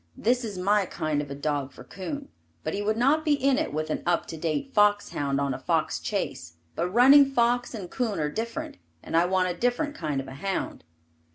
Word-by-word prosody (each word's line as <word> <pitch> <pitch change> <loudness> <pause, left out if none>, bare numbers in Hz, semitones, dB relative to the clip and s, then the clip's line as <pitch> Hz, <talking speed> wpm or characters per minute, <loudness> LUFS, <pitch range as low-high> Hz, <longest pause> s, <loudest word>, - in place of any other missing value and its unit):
This 245 +3 +1
is 210 -4 -5
my 200 +1 +2
kind 155 -3 -1
of 145 - -7
a 140 - -5
dog 145 -1 -2
for - - -12
coon, 275 +10 -6 0.3
but - - -2
he 200 - -2
would 215 +2 0
not 280 +6 +3
be 305 -2 +3
in 275 -1 +2
it - - -2
with 155 +1 -2
an - - -2
up 175 -1 +1
to - - -5
date 165 - -2
fox 205 -1 +3
hound 140 -1 -1
on 140 -1 0
a - - -5
fox - - 0
chase, 85 -1 -3 0.2
but 175 +2 -1
running 260 +7 +8
fox 245 -2 +1
and 195 -5 -6
coon 220 -4 -2
are 150 -1 -1
different, 230 - -4 0.3
and - - -4
I 170 +1 +5
want 185 0 +1
a - - -19
different 245 +5 0
kind 150 - -2
of 135 - -6
a 130 - -8
hound. 195 +8 -3
200 Hz, 225 wpm, -26 LUFS, 155-245 Hz, 0.3 s, running